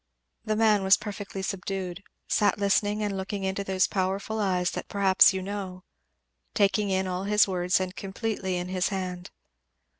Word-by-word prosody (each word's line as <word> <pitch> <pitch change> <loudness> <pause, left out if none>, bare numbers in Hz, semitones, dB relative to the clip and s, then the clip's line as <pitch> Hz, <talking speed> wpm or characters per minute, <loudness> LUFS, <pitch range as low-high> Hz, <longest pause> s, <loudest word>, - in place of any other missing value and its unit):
The 215 - -1
man 215 -2 +4
was 190 0 +5
perfectly 200 -2 -6
subdued 190 -1 -4 0.3
sat 205 -2 +2
listening 205 +1 +1
and 205 -1 -2
looking 195 +1 -4
into 190 +1 -2
those 190 -1 +2
powerful 195 +3 -2
eyes 180 -3 +1
that - - -5
perhaps 195 -1 +5
you 190 -1 -3
know, 190 -2 -6 0.7
taking 205 0 +2
in 190 0 +1
all 185 +1 -3
his 210 0 +4
words 180 -1 +1
and 185 0 -4
completely 195 -2 -3
in 180 +1 -4
his 185 -1 0
hand. 185 -2 -4
195 Hz, 160 wpm, -27 LUFS, 185-205 Hz, 0.7 s, was